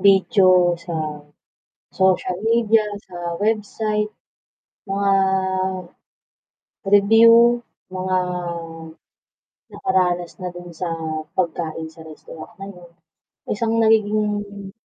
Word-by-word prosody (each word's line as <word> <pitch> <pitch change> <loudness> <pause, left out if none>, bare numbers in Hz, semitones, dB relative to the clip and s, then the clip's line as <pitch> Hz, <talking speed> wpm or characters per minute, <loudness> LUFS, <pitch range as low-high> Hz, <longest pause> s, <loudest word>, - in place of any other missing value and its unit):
Video 185 -2 +4
sa 160 -3 -5 0.7
social 185 -1 +1
media, 225 -1 +3 0.2
sa 175 -1 -6
website, 210 0 -1 0.8
mga 195 0 +1 1.8
review, 230 +4 +6 0.3
mga 185 0 -1 1.5
nakaranas 180 -1 -1
na 180 - -3
dun 175 0 -10
sa 170 +2 -4 0.5
pagkain 165 -2 -2
sa 160 0 -13
restaurant 155 +6 -12
na 195 -1 -8
yun, 175 -2 -15 0.6
isang 225 +1 -1
nagiging 205 -2 0
195 Hz, 80 wpm, -21 LUFS, 175-215 Hz, 1.8 s, review